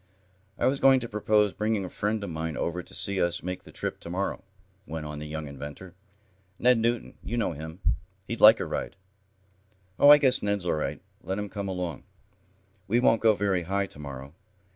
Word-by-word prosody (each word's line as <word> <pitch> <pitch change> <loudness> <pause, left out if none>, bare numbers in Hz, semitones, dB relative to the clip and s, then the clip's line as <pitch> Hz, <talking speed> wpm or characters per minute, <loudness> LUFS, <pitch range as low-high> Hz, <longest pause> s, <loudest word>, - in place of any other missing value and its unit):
"I - - 0
was 135 +2 +2
going 135 -1 +6
to 120 - -3
propose 105 -1 +2
bringing 105 -2 -1
a - - -6
friend 105 0 -1
of 100 - -5
mine 80 -1 -4
over 85 +1 -2
to - - -11
see 100 -1 0
us 85 0 0
make 90 +1 -5
the - - -13
trip - - -4
to - - -9
morrow," 95 +3 -2 0.4
went 80 0 -5
on 75 0 -6
the 75 - -6
young 80 0 -5
inventor. 75 +6 -9 0.6
"Ned 125 -1 +4
Newton, 115 +1 -1
you 120 - -3
know 115 - +1
him. 80 +5 -8 0.5
He'd 115 - -4
like 110 +2 +9
a - - -2
ride." - - -4 1.0
"Oh, 145 - +8
I 145 - +11
guess 130 -3 +4
Ned's 100 -3 -1
all 85 - +1
right. 75 - -2 0.2
Let 95 - -3
him 105 -1 -4
come 100 -1 -5
along. 90 -5 -4 0.9
We 115 +4 +3
won't 115 -3 +3
go 110 -2 +5
very 100 -3 0
high 100 +3 -1
to 75 - -12
morrow. 70 -1 -8
100 Hz, 205 wpm, -27 LUFS, 80-110 Hz, 1.0 s, I